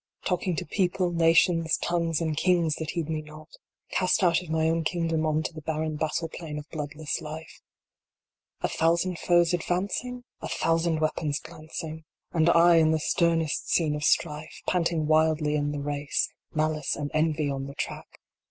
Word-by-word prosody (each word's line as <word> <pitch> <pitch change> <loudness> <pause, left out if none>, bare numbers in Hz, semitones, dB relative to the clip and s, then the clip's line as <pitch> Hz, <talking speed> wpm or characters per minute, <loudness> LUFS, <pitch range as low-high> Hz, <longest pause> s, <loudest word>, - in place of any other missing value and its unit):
Talking 180 -1 0
to - - -3
people, 180 +1 0
nations, 165 0 +3
tongues, 170 -2 0
and 160 -2 -1
kings 170 -1 +2
that 160 - -4
heed 170 -3 -2
me 155 -1 -2
not 155 +1 -13 0.4
Cast 185 +1 +2
out 170 -1 +4
of 175 - -11
my 160 0 +1
own 165 0 +1
kingdom 165 -1 0
on 155 0 +1
to 160 - -4
the 155 - -8
barren 155 0 -2
battle 160 +2 -1
plain 160 -2 -7
of 150 0 -7
bloodless 150 0 -4
life. 160 +1 -8 1.0
A - - +1
thousand 170 +2 +1
foes 175 0 +3
advancing? 200 +8 -2 0.2
A - - -5
thousand 165 -1 +1
weapons 155 -1 0
glancing 160 0 -8 0.3
1 165 - +1
And 160 - +5
I 170 0 +6
in 160 -1 +5
the 160 0 +2
sternest 165 -1 +1
scene 155 -3 +2
of 150 - -4
strife. 155 0 0
Panting 170 -3 +1
wildly 155 -1 +3
in 145 -1 0
the 145 - -3
race. 145 0 -1 0.2
Malice 155 -1 0
and 145 -1 -4
Envy 155 -1 +1
on 135 0 -4
the 140 - -9
track. - - -4
160 Hz, 175 wpm, -27 LUFS, 155-170 Hz, 1.0 s, I